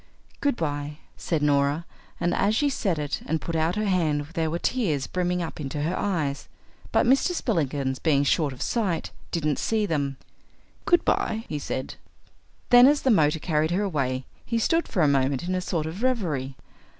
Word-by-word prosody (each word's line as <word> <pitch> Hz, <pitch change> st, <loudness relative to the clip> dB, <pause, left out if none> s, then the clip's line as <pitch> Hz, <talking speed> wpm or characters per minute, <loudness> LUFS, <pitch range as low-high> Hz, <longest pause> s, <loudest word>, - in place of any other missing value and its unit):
"Goodbye," 150 Hz, -, -2 dB, 0.2 s
said 160 Hz, -4 st, -2 dB
Norah, 145 Hz, +2 st, +2 dB, 0.3 s
and 175 Hz, -, +1 dB
as 210 Hz, +2 st, +2 dB
she 290 Hz, +4 st, +2 dB
said 195 Hz, -, -1 dB
it 150 Hz, -1 st, -3 dB
and 160 Hz, +1 st, 0 dB
put 170 Hz, -, -4 dB
out 160 Hz, +2 st, +1 dB
her 215 Hz, 0 st, -1 dB
hand 160 Hz, -7 st, +1 dB
there 165 Hz, -3 st, 0 dB
were 165 Hz, -, -1 dB
tears 170 Hz, -, 0 dB
brimming 180 Hz, -1 st, -1 dB
up 165 Hz, -, -7 dB
into 145 Hz, 0 st, -3 dB
her 170 Hz, +4 st, -1 dB
eyes. 155 Hz, -8 st, -2 dB, 0.4 s
But -, -, +3 dB
Mr. 270 Hz, +8 st, +3 dB
Spillikins, 140 Hz, -, -1 dB
being 145 Hz, -4 st, +2 dB
short 145 Hz, +1 st, +2 dB
of 130 Hz, -, -5 dB
sight, 200 Hz, -8 st, -1 dB, 0.2 s
didn't 155 Hz, -4 st, -1 dB
see 220 Hz, -2 st, +1 dB
them. 140 Hz, -6 st, -1 dB, 0.7 s
"Goodbye," 225 Hz, -9 st, +2 dB
he 150 Hz, -, -3 dB
said. 130 Hz, -2 st, -4 dB, 0.7 s
Then 245 Hz, +1 st, +9 dB
as 290 Hz, +1 st, +3 dB
the 265 Hz, -, +4 dB
motor 155 Hz, -6 st, +4 dB
carried 155 Hz, -1 st, 0 dB
her 185 Hz, +4 st, 0 dB
away 135 Hz, -8 st, -1 dB, 0.2 s
he 230 Hz, -, -1 dB
stood 330 Hz, +9 st, +1 dB
for 180 Hz, -, +1 dB
a -, -, +5 dB
moment 135 Hz, 0 st, +1 dB
in 180 Hz, +1 st, -2 dB
a 185 Hz, -, 0 dB
sort 165 Hz, -3 st, -2 dB
of 165 Hz, +6 st, -6 dB
reverie. 165 Hz, -, -1 dB
160 Hz, 180 wpm, -25 LUFS, 145-200 Hz, 0.7 s, Then